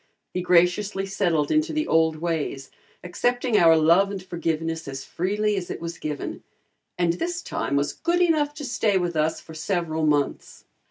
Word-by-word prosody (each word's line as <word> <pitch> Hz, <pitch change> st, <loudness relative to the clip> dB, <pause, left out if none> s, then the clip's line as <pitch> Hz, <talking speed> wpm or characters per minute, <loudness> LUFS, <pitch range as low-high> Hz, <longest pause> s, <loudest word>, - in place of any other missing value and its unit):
He 180 Hz, -, -1 dB
graciously 180 Hz, +3 st, +2 dB
settled 175 Hz, -6 st, 0 dB
into 310 Hz, +1 st, +1 dB
the 310 Hz, 0 st, 0 dB
old 160 Hz, 0 st, +3 dB
ways, 155 Hz, -5 st, -3 dB, 0.3 s
accepting 245 Hz, +6 st, 0 dB
our 165 Hz, -4 st, +6 dB
love 170 Hz, +5 st, +4 dB
and 195 Hz, -2 st, -6 dB
forgiveness 165 Hz, -2 st, -3 dB
as 135 Hz, 0 st, -6 dB
freely 210 Hz, +4 st, -1 dB
as 185 Hz, -3 st, -4 dB
it -, -, -5 dB
was 170 Hz, +1 st, -6 dB
given, 150 Hz, -1 st, -5 dB, 0.6 s
and 175 Hz, -1 st, +2 dB
this 350 Hz, -, -3 dB
time 140 Hz, -, -2 dB
was 140 Hz, 0 st, 0 dB
good 345 Hz, +2 st, 0 dB
enough 310 Hz, -4 st, +2 dB
to 295 Hz, -1 st, -6 dB
stay 220 Hz, -5 st, +1 dB
with 175 Hz, -2 st, -1 dB
us 155 Hz, +1 st, +1 dB
for 160 Hz, -, -13 dB
several 160 Hz, -1 st, -2 dB
months. 145 Hz, -2 st, -1 dB
175 Hz, 170 wpm, -24 LUFS, 160-210 Hz, 0.6 s, our